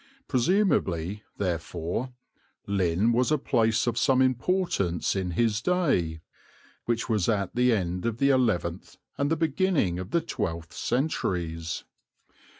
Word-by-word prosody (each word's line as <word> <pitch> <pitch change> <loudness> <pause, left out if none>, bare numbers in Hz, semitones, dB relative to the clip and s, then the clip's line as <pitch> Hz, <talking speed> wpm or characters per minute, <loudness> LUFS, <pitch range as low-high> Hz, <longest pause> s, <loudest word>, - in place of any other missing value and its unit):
Presumably, 115 - +1 0.2
therefore, 90 +5 -3 0.5
Lynn 100 +2 +1
was 125 +4 +2
a 155 - +4
place 115 -5 +1
of 120 -1 0
some 135 -1 +3
importance 130 - +1
in 95 -2 -1
his 115 -2 +2
day, 135 - +1 0.6
which 115 -1 -1
was 105 -4 +1
at 100 -4 0
the 125 0 +4
end 90 -2 -1
of 115 -1 -2
the 140 +3 +3
eleventh 95 -9 0 0.2
and 140 0 +1
the 165 - +2
beginning 155 - +1
of 95 +1 -6
the 170 - +2
twelfth 85 - -4
centuries. 85 - -2
115 Hz, 130 wpm, -27 LUFS, 90-130 Hz, 0.6 s, a